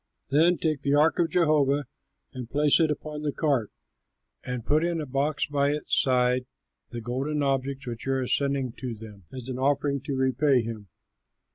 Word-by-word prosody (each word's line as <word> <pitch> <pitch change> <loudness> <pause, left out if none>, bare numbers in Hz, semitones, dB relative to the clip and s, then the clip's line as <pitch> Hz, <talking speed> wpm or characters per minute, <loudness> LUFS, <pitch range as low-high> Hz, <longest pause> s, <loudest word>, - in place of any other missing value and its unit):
Then 165 +5 +4
take 155 -3 -1
the 140 0 +1
ark 155 +4 +3
of 170 -1 +2
Jehovah 150 -4 +2 0.5
and 125 -3 -7
place 145 +3 +4
it 160 -2 +3
upon 150 0 -4
the 150 -1 -1
cart 140 -8 0 0.7
and 125 -2 -3
put 150 +4 +2
in 170 -1 0
a 155 - -3
box 140 +3 0
at 140 0 +2
its 150 0 -1
side 125 -1 +1 0.4
the 120 -1 -6
golden 135 +6 -2
objects 135 0 -1
which 120 0 -6
you 135 - +1
are 130 -1 0
sending 140 -1 0
to 125 -3 -5
them 105 -4 -12
as 130 -2 -8
an 130 -1 -4
offering 140 0 +1
to 140 - -2
repay 130 0 +2
him. 110 -3 -7
140 Hz, 180 wpm, -26 LUFS, 125-150 Hz, 0.7 s, Then